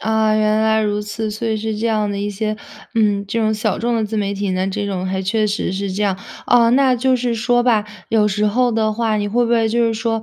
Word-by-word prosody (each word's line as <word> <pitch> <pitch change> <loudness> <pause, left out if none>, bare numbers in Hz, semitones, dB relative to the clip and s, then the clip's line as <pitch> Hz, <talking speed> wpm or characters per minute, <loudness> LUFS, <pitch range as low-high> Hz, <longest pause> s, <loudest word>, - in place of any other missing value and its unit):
啊， 220 -1 +1
原 215 0 +2
来 220 0 +2
如 210 0 -1
此， 210 +1 -4
所 220 +2 -4
以 220 - 0
是 215 0 -3
这 230 - -1
样 215 -2 0
的 200 - -3
一 205 +1 -2
些， 215 +1 -2 0.4
嗯， 205 -3 +2
这 230 +3 -2
种 220 0 +1
小 215 - -1
众 235 0 0
的 220 - 0
自 215 +1 -4
媒 200 -1 -1
体 200 0 -2
呢， 185 +1 -1
这 200 +1 -3
种 185 -2 -3
还 190 0 -2
确 215 +3 +1
实 205 -2 -2
是 195 0 -3
这 200 +3 -2
样。 195 -2 0 0.3
哦， 235 -1 +5
那 265 -1 +4
就 255 +1 +2
是 240 -1 -1
说 245 +2 +1
吧， 225 -4 +2 0.3
有 215 -2 +3
时 210 +1 0
候 245 +4 +2
的 220 -1 0
话， 220 -1 0
你 205 0 -1
会 240 +4 +1
不 235 - -2
会 230 -1 +3
就 235 +1 +2
是 225 - 0
说， 225 0 -2
215 Hz, 290 characters per minute, -19 LUFS, 205-230 Hz, 0.4 s, 哦